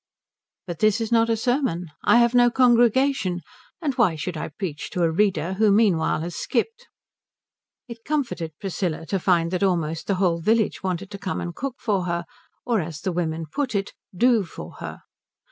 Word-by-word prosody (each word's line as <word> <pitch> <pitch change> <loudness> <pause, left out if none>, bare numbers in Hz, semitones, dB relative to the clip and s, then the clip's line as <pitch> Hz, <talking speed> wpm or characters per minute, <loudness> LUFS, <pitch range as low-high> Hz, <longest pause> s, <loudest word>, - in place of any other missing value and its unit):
But 175 -4 -6
this 215 0 +3
is 225 0 -3
not 230 0 +4
a 225 - +2
sermon. 245 - 0 0.2
I - - +5
have 235 0 +4
no 245 -1 +6
congregation. 240 -5 +3 0.4
And 290 -3 0
why 190 -9 +4
should 165 +3 -4
I 155 - -4
preach 155 -2 -5
to 180 - -1
a 165 - +3
reader 185 -1 +1
who 210 +2 +3
meanwhile 195 -8 +3
has 170 +1 -5
skipped? 460 +2 -2 1.0
It 235 -1 -10
comforted 235 - -2
Priscilla 180 -4 -3
to 195 +3 -1
find 170 -2 +2
that 185 - -1
almost 165 -4 0
the 200 - +1
whole 180 -3 +1
village 220 +5 +1
wanted 190 0 -3
to 200 - -7
come 190 -1 -3
and 175 - -4
cook 265 +6 -4
for 200 -5 -1
her, 170 -1 -2 0.4
or 230 -5 +1
as 155 -2 -7
the 190 - -1
women 165 -2 -2
put 255 - -3
it 195 0 -2 0.2
"do" 240 0 +4
for 170 - -10
her. - - -7
195 Hz, 185 wpm, -24 LUFS, 170-235 Hz, 1.0 s, no